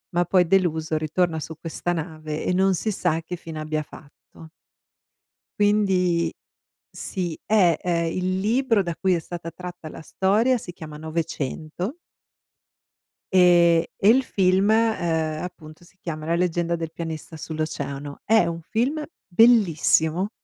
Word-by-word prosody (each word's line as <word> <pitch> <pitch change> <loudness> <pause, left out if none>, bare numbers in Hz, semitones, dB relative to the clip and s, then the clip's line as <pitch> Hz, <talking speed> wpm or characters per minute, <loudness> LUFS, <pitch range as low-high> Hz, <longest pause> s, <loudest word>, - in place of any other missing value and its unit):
ma 175 - +4
poi 180 -1 +3
deluso 160 -4 +1
ritorna 160 +1 0
su 160 +1 -7
questa 170 +1 -3
nave 155 -2 -5
e 180 - +1
non 190 +1 +3
si 215 +5 -2
sa 165 -4 0
che 180 +2 -6
fine 160 -2 -8
abbia 155 0 -2
fatto. 155 +2 -15 1.1
Quindi 185 -5 +2 0.6
sì, 175 -5 -4
eh! 190 -6 +3
Ehm, 170 -2 0
il 185 +1 -1
libro 225 0 +2
da 170 -1 -3
cui 190 -1 +2
è - - -1
stata 170 0 -7
tratta 175 -1 -9
la - - -10
storia 215 +10 +2
si 175 -5 -9
chiama 155 -3 -9
900. 160 - -4 1.4
E 175 -2 +5
e 200 - +4
il 260 +3 +5
film, 190 -1 +2
ehm, 170 -9 +1
appunto, 155 -2 -10
si 190 +2 -22
chiama 155 -2 -5
"La 170 - +2
leggenda 170 -1 0
del 165 -1 -5
pianista 160 -1 -6
sull'oceano". 145 -3 -5
È 220 0 +4
un 170 0 -4
film 260 - -1 0.2
bellissimo! 185 -4 +4
170 Hz, 140 wpm, -24 LUFS, 160-190 Hz, 1.4 s, E